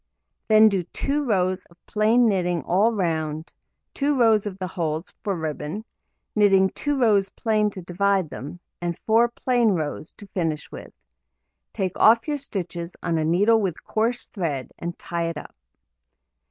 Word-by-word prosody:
Then 220 0 +7
do 195 -3 +1
2 280 - -2
rows 185 -4 +1
of 170 - -23
plain 220 +3 +3
knitting 180 -6 0
all 200 - +3
round, 160 -6 -2 0.4
2 285 0 0
rows 220 -3 +4
of 190 -2 -6
the 185 - -4
holes 165 -2 -3
(for 200 -3 -1
ribbon), 155 +6 -4 0.5
knitting 195 -2 +4
2 290 -2 -2
rows 205 -5 +3
plain 215 -1 +1
to 190 -3 -9
divide 190 -1 0
them, 150 +7 -7 0.2
and 175 -1 -2
4 225 +2 +4
plain 240 -2 +1
rows 155 -2 -3
to 205 - -13
finish 165 -5 -3
with. - - -9 0.8
Take 185 -2 -3
off 230 +3 +5
your 295 -1 0
stitches 175 -8 -5
on 170 -2 0
a - - 0
needle 205 +8 +3
with 185 -5 -3
coarse 230 +3 -1
thread, 155 - -4
and 170 0 -5
tie 170 -1 -3
it 165 - -5
up. - - -9
190 Hz, 160 wpm, -24 LUFS, 170-220 Hz, 0.8 s, Then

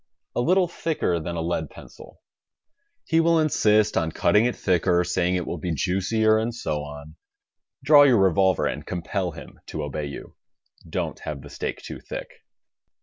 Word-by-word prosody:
A - - +1
little 180 +7 +3
thicker 160 - -1
than 85 +2 -5
a 80 - -2
lead 80 -3 -2
pencil. - - -14 0.8
He 165 - +2
will 165 0 +4
insist 110 -8 +3
on 80 0 0
cutting 105 +7 +3
it 125 - 0
thicker, 90 -1 +2
saying 90 0 0
it 90 - -2
will 85 - -4
be 85 0 -2
juicier 110 +6 +2
and 115 +1 -2
so 80 -10 -2
on. 75 +2 -10 0.7
Draw 145 +1 +7
your 130 -4 +5
revolver 95 -1 +3
and - - -3
compel 90 +1 -3
him 80 - -12
to 75 - -4
obey 75 +1 -4
you. 70 - -9 0.6
Don't - - -3
have 75 -3 -6
the - - -12
steak - - -5
too - - -7
thick. - - -7
90 Hz, 170 wpm, -24 LUFS, 80-115 Hz, 0.8 s, Draw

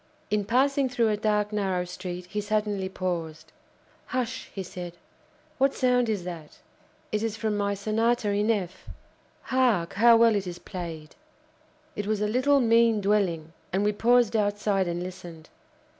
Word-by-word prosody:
In 210 -1 +1
passing 265 +4 +2
through 235 -3 +1
a 210 - +1
dark, 210 0 0
narrow 190 -3 0
street, 180 0 -6
he 210 +4 -3
suddenly 210 -2 -1
paused. 170 -4 -4 0.6
"Hush!" 250 -2 -3
he 195 - -5
said, 175 -1 -7 0.7
"what 275 +1 +3
sound 250 -2 +2
is 205 -5 -1
that? 170 -4 -8 0.5
It 210 - 0
is 220 -1 -2
from 220 -1 -1
my 200 0 0
Sonata 220 +2 0
in 205 +2 +1
F. 190 -5 -2 0.6
Hark! 245 -10 +1
how 230 +3 +6
well 230 -1 +5
it 195 -2 -2
is 175 -1 -5
played!" 165 -4 -7 0.8
It 205 -1 -4
was 215 -1 0
a 210 - 0
little, 260 +6 +3
mean 230 -1 +4
dwelling, 190 -6 0 0.2
and 190 +2 +1
we 210 - +3
paused 235 +1 +3
outside 205 -2 +1
and 175 0 -2
listened. 175 -3 -9
205 Hz, 160 wpm, -26 LUFS, 180-225 Hz, 0.8 s, how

